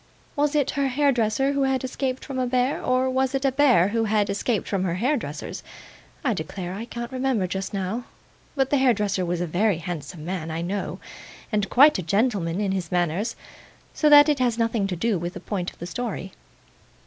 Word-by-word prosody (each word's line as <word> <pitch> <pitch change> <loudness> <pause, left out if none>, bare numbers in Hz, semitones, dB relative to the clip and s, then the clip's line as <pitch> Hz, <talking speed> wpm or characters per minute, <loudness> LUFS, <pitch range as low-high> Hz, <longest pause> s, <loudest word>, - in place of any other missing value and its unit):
Was 295 0 +1
it 290 -3 +2
her 280 -1 0
hairdresser 270 -2 +2
who 280 - 0
had 265 0 +1
escaped 260 0 -3
from 270 -2 -4
a 255 - 0
bear, 250 +2 +1
or 255 +1 +2
was 260 +1 0
it 270 +1 -1
a 270 - +3
bear 250 -10 +4
who 225 +1 0
had 210 -1 +1
escaped 205 +1 -1
from 195 -2 -1
her 175 -2 -1
hairdresser's? 215 - -2 0.6
I 245 - +3
declare 180 +1 -5
I 215 +4 -5
can't 235 +1 -6
remember 255 -6 0
just 190 +2 -4
now, 200 +5 -3 0.5
but 270 -2 +1
the 285 - +3
hairdresser 210 -7 +2
was 175 0 -2
a - - 0
very 185 +3 +1
handsome 160 -2 -6
man, 175 -3 -4
I 165 +1 -3
know, 195 +3 -3 0.5
and 210 -2 0
quite 280 -3 +6
a - - -1
gentleman 195 -1 0
in 200 -2 0
his 185 -4 -3
manners; 180 +5 0 0.6
so 305 - +3
that 290 0 +9
it 295 -3 +2
has 240 -3 +1
nothing 230 -3 0
to 185 - -3
do 200 +2 0
with 175 +1 -5
the - - -5
point 185 -4 -3
of - - -22
the 170 - -7
story. 195 0 -4
220 Hz, 205 wpm, -24 LUFS, 185-260 Hz, 0.6 s, that